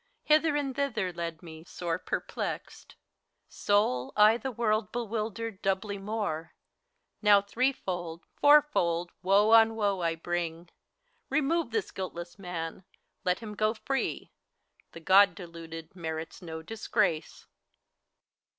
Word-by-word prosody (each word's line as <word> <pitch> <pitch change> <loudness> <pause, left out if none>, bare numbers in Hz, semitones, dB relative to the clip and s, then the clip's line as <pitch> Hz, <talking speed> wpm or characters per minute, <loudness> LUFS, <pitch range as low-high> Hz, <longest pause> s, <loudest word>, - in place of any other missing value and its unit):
Hither 310 0 +4
and 275 -3 -1
thither 220 -10 -1
led 170 -1 -5
me, 160 -1 -10
sore 170 0 -3
perplexed. - - -5 0.5
Sole, 170 -12 +1
I 210 +1 +7
the 265 +2 -4
world 215 -2 0
bewildered, 225 -2 -3
doubly 195 +1 -1
more; 195 -6 -3 0.7
Now 205 -1 +7
threefold, 190 -7 -2
fourfold, 285 - +4
woe 200 +4 +4
on 225 0 +7
woe 200 -3 0
I 165 -1 0
bring. 170 0 -3 0.6
Remove 310 -1 +1
this 220 -4 -2
guiltless 175 -1 -6
man, 175 -1 -5 0.4
let 180 +2 0
him 215 -2 -7
go 215 +2 +1
free! 270 +4 -3 0.6
The 165 - -10
(jk)d 195 +4 +6
deluded 165 -2 -9
merits 160 -1 -5
no 160 -2 -7
disgrace. 165 -5 -1
195 Hz, 115 wpm, -29 LUFS, 170-225 Hz, 0.7 s, I